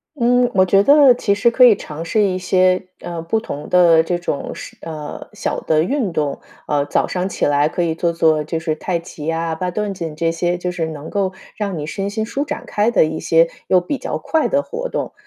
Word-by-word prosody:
嗯， 245 -1 +3
我 185 -1 +4
觉 195 +2 +4
得 285 0 +7
其 225 -4 0
实 205 +4 +3
可 255 - +4
以 240 -4 +8
尝 155 -3 -7
试 210 +6 +1
一 185 -2 0
些， 185 0 +2
呃， 170 -1 -6
不 170 +7 -1
同 150 -8 -7
的 170 -3 +5
这 175 +2 -1
种 175 -4 -4
是 - - -10
呃， 155 -2 -7
小 - - -3
的 155 -1 +2
运 245 - -1
动。 150 -3 -2 0.2
啊， 145 -1 +1
早 145 - 0
上 185 +1 -2
起 - - -1
来 145 +1 +2
可 175 - -1
以 165 -1 -1
做 170 +1 0
做 160 -2 +2
就 160 +2 -3
是 160 -1 -2
太 170 +2 -2
极， 165 -3 -9
呀， 165 0 -1
八 180 +2 -3
段 210 +1 -2
锦 165 -4 -6
这 165 +1 0
些 175 +1 -1
就 180 0 -3
是 165 -2 -2
能 155 -1 -7
够 195 -2 -1 0.3
让 200 -4 -3
你 150 - -4
身 195 +5 -3
心 220 +1 -2
舒 275 +5 -2
展 295 - -6
开 210 +3 +1
的 215 - +4
一 160 0 -4
些 165 0 +3 0.2
又 185 - +4
比 180 +11 -3
较 - - -4
快 320 -1 0
的 280 - +1
活 475 +10 -5
动， - - -4
180 Hz, 250 characters per minute, -19 LUFS, 160-205 Hz, 0.3 s, 以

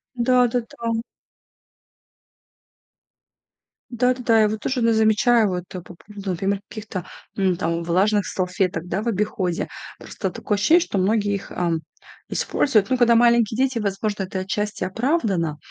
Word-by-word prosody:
Да-да-да. 235 -2 +1 2.9
Да-да-да, 245 -2 +2
я 215 - +4
вот 215 0 -4
тоже 260 -1 -1
иногда 230 -1 +3
замечаю, 220 0 +4
вот, 180 -1 -3
э, 180 - -5
по 175 +1 -13
поводу, 200 +1 -9
например, 195 +3 -1
каких-то, 205 -5 -6 0.3
м, 190 -3 +1
там, 165 +1 -1
влажных 195 +4 +2
салфеток, 180 -2 -2
да, 190 +3 -2
в 230 - -5
обиходе. 190 -4 -1 0.3
Просто - - -4
такое 210 - -2
ощущение, 310 - +4
что 330 - -3
многие 205 +2 +1
их, 195 - -7
ам, 170 -2 -1 0.5
используют. 220 -7 +1
Ну, 260 - +2
когда 235 -1 +5
маленькие 235 -2 +4
дети, 260 -2 +1
возможно, 205 0 -2
это 190 0 -4
отчасти 210 +2 -3
оправдано, 195 - 0
210 Hz, 140 wpm, -22 LUFS, 185-235 Hz, 2.9 s, когда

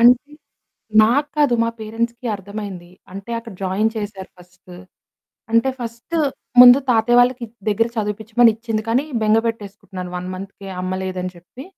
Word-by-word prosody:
అంటే, 250 +5 +5 0.7
నాకు 280 +7 +2
కాదు 285 -5 +4
మా 230 - 0
పేరెంట్స్‌కి 235 +3 -3
అర్థమైంది. 195 -3 -8 0.2
అంటే, 195 +4 -8
అక్కడ 230 -2 -10
జాయిన్ 195 +4 +1
చేశారు 205 -3 -6
ఫస్ట్. 180 0 -17 0.8
అంటే, 230 +3 +3
ఫస్ట్ 235 +7 -7 0.5
ముందు 250 +2 +10
తాతయ్య 240 +1 +4
వాళ్ళకి 245 0 +1 0.2
దగ్గర 225 +3 +1
చదివిపిచ్చమని 220 +2 +2
ఇచ్చింది. 225 -2 -3
కానీ, 255 +6 +2 0.2
బెంగ 215 +1 +4
బెట్టేసుకుంటున్నాను 200 -4 -6
1 180 +1 -5
మంత్‌కే 195 +1 -9
అమ్మ 185 0 -2
లేదని 185 -1 -4
చెప్పి. 180 +10 -12
220 Hz, 140 wpm, -20 LUFS, 195-235 Hz, 0.8 s, ముందు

